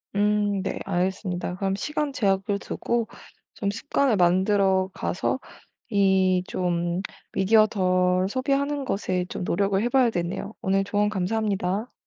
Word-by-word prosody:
음 205 -1 +1
네 - - -3
알겠습니다. 180 -1 -2
그럼 195 +1 -1
시간 300 +6 -2
제약을 200 -4 0
두고 235 +2 -2 0.5
좀 200 -1 -2
습관을 265 +2 +1
만들어 190 +1 +3
가서 190 +8 -2 0.5
이 190 -3 +3
좀 175 0 -1 0.3
미디어 215 +3 +4
덜 185 -2 +1
소비하는 275 +4 0
것에 185 -4 -1
좀 180 - -5
노력을 195 +2 +1
해 240 - +1
봐야 260 -2 +4
되네요. 180 +3 -3
오늘 195 +1 +1
조언 205 +1 +1
감사합니다. 205 +1 -1
195 Hz, 280 characters per minute, -25 LUFS, 185-215 Hz, 0.5 s, 미디어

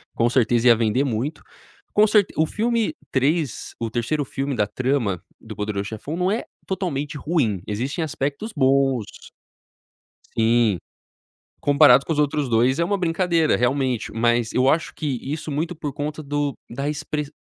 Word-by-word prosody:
com 120 +1 +2
certeza, 120 -1 +2
ia 120 - +8
vender 115 +3 +1
muito. 135 +4 -3 0.5
Com 210 +1 +5
certe 210 -2 +3
o 160 - +4
filme 230 - 0 0.2
3 140 0 0
o 115 - -2
3º 120 +6 -1
filme 135 +1 -3
da 105 -3 +2
trama, 120 -5 -1 0.2
do 110 -1 -10
Poderão 105 0 -2
Chefão, 110 +9 -6
não 180 +2 +1
é 225 - -1 0.2
totalmente 150 -6 -3
ruim. 135 - 0
Existem 130 +10 -2
aspectos 150 +7 -3
bons. 135 -4 +1 1.1
Sim. 115 -3 +3 0.8
Comparado 140 -2 +6
com - - -3
os 150 - 0
outros 145 -2 +1
2, 120 +4 +3
é - - +3
uma 200 +4 0
brincadeira, 170 -2 +2
realmente. 125 -2 0
Mas, 120 0 +1
eu 130 +1 +2
acho 160 +3 +1
que - - -6 0.2
isso 150 +3 -5
muito 165 +5 -2
por 150 -3 -5
conta 150 +2 -4
do 145 0 -1 0.2
da 140 +5 -3
express 150 0 -4
140 Hz, 160 wpm, -23 LUFS, 120-155 Hz, 1.1 s, ia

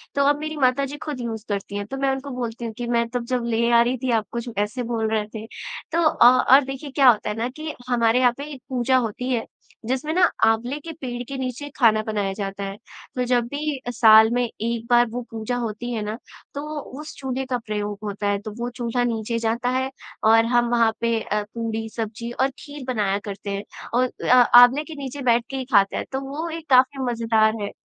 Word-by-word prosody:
तो 280 - +3
अब 290 0 +3
मेरी 310 0 -5
माताजी 275 +2 +1
ख़ुद 295 -4 -5
यूज़ 225 -2 -5
करती 200 0 -3
हैं। 205 - -3
तो 270 - -5
मैं 275 0 +1
उनको 270 +1 -4
बोलती 235 -1 -4
हूँ 225 - -5
कि 240 -1 -4
"मैं 235 -1 +1
तब 245 -1 -3
जब 250 -1 -1
ले 235 0 +1
आ 235 0 +6
रही 245 +2 +1
थी 255 - +1
आप 220 -2 +1
कुछ 235 0 -4
ऐसे 210 +5 -1
बोल 225 -2 -1
रहे 215 -1 0
थे।" 220 0 -6 0.5
तो 335 - +2
अ, 310 - +4 0.3
और 280 +1 +8
देखिए 270 +1 -7
क्या 270 -2 +6
होता 210 -2 +2
है 210 - -3
ना 235 +2 -1
कि 310 +4 -6 0.2
हमारे 235 0 +3
यहाँ 250 -1 +5
पे 285 - -5
एक 260 - -11
पूजा 255 0 +2
होती 250 +2 -2
है, 230 - -1 0.4
जिसमें 265 +6 -1
ना 360 0 +4 0.2
आँवले 235 +5 +1
के 325 +2 -8
पेड़ 245 -1 -4
के 275 - -4
नीचे 260 +2 -4
खाना 220 -4 +4
बनाया 205 -3 -1
जाता 200 -1 -5
है। 195 +1 -5 0.4
तो 250 - 0
जब 245 -1 +2
भी 285 0 -3
साल 220 -1 +7
में 245 0 +2
एक 230 0 -4
बार 240 0 +5
वो 245 +2 -4
पूजा 225 +2 -3
होती 230 +2 -4
है 220 - -2
ना 215 +2 -4 0.4
तो 285 - -4 0.4
उस 310 - -9
चूल्हे 265 0 -3
का 255 -1 -1
प्रयोग 210 -1 -3
होता 205 0 -3
है। 200 0 +1
तो 215 - -7
वो 240 +1 -2
चूल्हे 245 0 -1
नीचे 230 0 -2
जाता 230 +2 0
है 260 +1 0 0.3
और 225 +1 +6
हम 240 0 +2
वहाँ 230 -2 +4
पे 230 -1 +1
अ, 210 0 -2
पूड़ी, 225 -1 -3
सब्ज़ी 230 +1 -4
और 265 +3 +1
खीर 290 -2 -9
बनाया 200 -2 0
करते 200 0 -6
हैं। 200 +1 -3 0.3
और 250 +1 +2 0.2
अ, - - +7
आँवले 245 +3 +7
के 320 0 -9
नीचे 275 +2 -6
बैठके 240 +2 +1
ही 260 - -4
खाते 195 -1 +4
हैं। - - -3
तो 265 +1 -2
वो 320 +4 -4
एक 325 -2 -7
काफ़ी 260 +1 +4
मज़ेदार 225 -2 +2
है। 200 - -4
240 Hz, 230 wpm, -23 LUFS, 220-260 Hz, 0.5 s, और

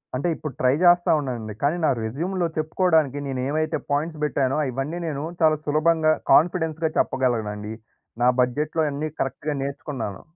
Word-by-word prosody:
అంటే 135 +7 -1
ఇప్పుడు 155 -3 -6
ట్రై 130 0 +3
జేస్తా 175 -1 +5
ఉన్నానండి. 120 -6 -4
కానీ 150 +5 +2
నా - - +4
రెజ్యూమ్‌లో 170 +10 -1
చెప్పుకోవడానికి 155 -3 +2
నేను 130 -2 -3
ఏవైతే 155 +1 0
పాయింట్స్ 150 +2 -1
బెట్టానో 135 -1 +1
ఇవన్నీ 140 +7 -3
నేను 145 -1 -3 0.2
చాలా 155 -1 +4
సులభంగా, 155 +1 +3 0.2
కాన్ఫిడెన్స్‌గా 160 -1 +3
చెప్పగలనండి. 110 -5 0 0.5
నా 125 - +6
బడ్జెట్‌లో 150 +6 0
అన్నీ 150 +2 -3
కరెక్ట్‌గా 145 +3 -2
నేర్చుకున్నాను. 135 -7 -5
150 Hz, 140 wpm, -24 LUFS, 130-160 Hz, 0.5 s, నా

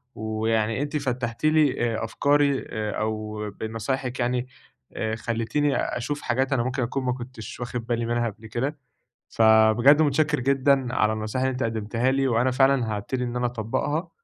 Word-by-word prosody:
ويعني 110 +2 -1
أنتِ 145 +1 -2
فتّحتِ 125 -1 -3
لي 145 -7 +3
آآ - - -3
أفكاري، 140 +3 +2 0.3
أو 110 0 -3
بنصايحِك 125 +5 -4
يعني 125 +1 0 0.5
آآ 110 0 -2
خليتيني 115 +6 -1
أشوف 145 +5 -2
حاجات 130 +3 0
أنا 125 -3 +1
ممكن 130 +1 -1
أكون 130 +3 -2
ما 125 - +1
كنتش 120 -3 -8
واخد 120 -1 -4
بالي 120 -1 0
منها 120 0 0
قبل 110 +2 -12
كده. 135 +7 -2 0.5
فبجد 110 +6 +5
متشكّر 150 0 +2
جدًا 135 -1 +2
على 110 0 +2
النصايح 110 +4 -2
اللي 130 - +1
أنتِ 130 - -2
قدمتيها 115 +3 0
لي، 135 0 +1
وأنا 120 +1 +2
فعلًا 130 -4 +2
هابتدي 125 +5 -3
إن 120 0 -4
أنا 125 - 0
أطبّقها، 130 - -2
125 Hz, 160 wpm, -25 LUFS, 115-135 Hz, 0.5 s, فبجد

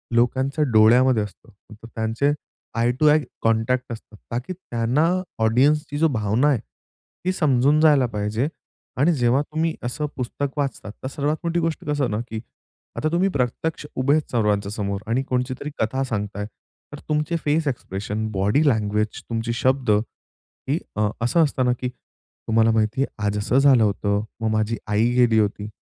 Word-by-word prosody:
लोकांच्या 130 +5 +2
डोळ्यामध्ये 115 +1 +5
असतं. 105 +3 -11 0.2
तर 115 +2 -13
त्यांचे 115 +6 +1 0.5
आई 120 +1 +3
टू 155 - +4
आई 150 +1 +5 0.2
कॉन्टॅक्ट 115 +3 +1
असतात 110 -1 -12
ता 120 - -1
की 185 - -3
त्यांना 130 -3 0 0.4
ऑडियन्सची 145 +6 +2
जो 160 +2 +4
भावना 110 0 +1
आहे, 135 - +2 0.7
ती 185 - +2
समजून 145 -3 +3
जायला 145 -5 +5
पाहिजे. 105 +4 -1 0.5
आणि 155 +7 +4
जेव्हा 125 -1 +2
तुम्ही 160 +2 -2
असं 125 +5 -2
पुस्तक 135 +3 -3
वाचतात 135 -7 -3
तर - - -2
सर्वात 145 +3 -1
मोठी 170 +1 0
गोष्ट 165 -1 -2
कसं 145 -4 0
ना? 105 - -1
की 110 -1 -5 0.6
आता 155 - 0
तुम्ही 185 +3 +2
प्रत्यक्ष 145 +2 -2
उभेच 140 +4 +1
सर्वांच्या 105 -4 +1
समोर 100 -2 -3
आणि 125 +4 +1
कोणचीतरी 130 +2 -2
कथा 130 +5 0
सांगताय, 105 -4 -3 0.5
तर 145 - -7
तुमचे 150 +2 0
फेस 150 +1 +1
एक्सप्रेशन, 105 -3 -3
बॉडी 105 +10 +2
लँग्वेज 105 -2 -1
तुमची 115 0 -2
शब्द 130 +1 +1
ही 105 +2 -2 0.7
अ, 105 -1 +2
असं 160 +8 +3
असतं 135 -3 0
ना 125 - +3
की 125 - -1
तुम्हाला 115 -2 -2
माहितीये 110 +5 +1 0.2
आज 105 0 0
असं 105 +5 +1
झालं 135 -4 +5
होतं. 100 0 0 0.2
मग 110 - +1
माझी 110 +1 0
आई 105 +3 +2
गेली 120 -3 +4
होती. 105 0 -1
125 Hz, 160 wpm, -23 LUFS, 110-145 Hz, 0.7 s, डोळ्यामध्ये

